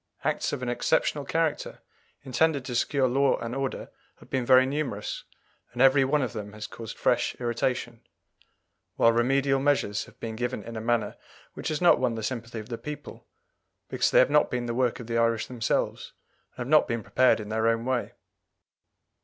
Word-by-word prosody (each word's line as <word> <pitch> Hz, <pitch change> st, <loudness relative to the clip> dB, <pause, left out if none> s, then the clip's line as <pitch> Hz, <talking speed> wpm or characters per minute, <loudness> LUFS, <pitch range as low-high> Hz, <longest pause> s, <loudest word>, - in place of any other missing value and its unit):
Acts -, -, 0 dB
of 125 Hz, -, -4 dB
an -, -, -3 dB
exceptional 140 Hz, +3 st, 0 dB
character 165 Hz, +1 st, -1 dB, 0.5 s
intended 140 Hz, +1 st, +1 dB
to 125 Hz, -, -5 dB
secure 130 Hz, +2 st, +1 dB
law 135 Hz, +2 st, +2 dB
and 115 Hz, 0 st, -5 dB
order 135 Hz, -1 st, -4 dB, 0.2 s
have -, -, -19 dB
been 130 Hz, -2 st, -1 dB
very 130 Hz, 0 st, +7 dB
numerous, 135 Hz, -7 st, -3 dB, 0.5 s
and 120 Hz, -, -9 dB
every 135 Hz, +1 st, +6 dB
one 140 Hz, +2 st, +1 dB
of 125 Hz, -, -3 dB
them 105 Hz, -2 st, -6 dB
has 105 Hz, 0 st, -7 dB
caused 115 Hz, 0 st, -8 dB
fresh -, -, +1 dB
irritation; 120 Hz, -1 st, -2 dB, 0.9 s
while 115 Hz, -, +5 dB
remedial 135 Hz, +3 st, +2 dB
measures 135 Hz, -7 st, +1 dB
have -, -, -19 dB
been 110 Hz, -1 st, -5 dB
given 120 Hz, -2 st, -3 dB
in 115 Hz, +2 st, -8 dB
a 110 Hz, -, -4 dB
manner 120 Hz, 0 st, 0 dB, 0.4 s
which -, -, -6 dB
has 155 Hz, 0 st, -2 dB
not 175 Hz, -, +6 dB
won 125 Hz, -3 st, 0 dB
the 110 Hz, -, -5 dB
sympathy 115 Hz, -1 st, -4 dB
of 110 Hz, +1 st, -7 dB
the 115 Hz, -, -5 dB
people, 150 Hz, 0 st, -8 dB, 0.6 s
because -, -, +1 dB
they -, -, +2 dB
have -, -, +5 dB
not 150 Hz, 0 st, +4 dB
been 125 Hz, -1 st, -2 dB
the 120 Hz, -, -2 dB
work 125 Hz, -1 st, 0 dB
of 120 Hz, -, -7 dB
the 115 Hz, 0 st, -1 dB
Irish 115 Hz, -1 st, +1 dB
themselves, 120 Hz, -3 st, -2 dB, 0.4 s
and 125 Hz, -, -3 dB
have -, -, -8 dB
not 155 Hz, +2 st, +5 dB
been 115 Hz, -1 st, -2 dB
prepared 130 Hz, -2 st, +3 dB
in 105 Hz, -1 st, -7 dB
their 110 Hz, +1 st, 0 dB
own 115 Hz, 0 st, +1 dB
way. 130 Hz, -1 st, -1 dB
125 Hz, 195 wpm, -27 LUFS, 115-135 Hz, 0.9 s, very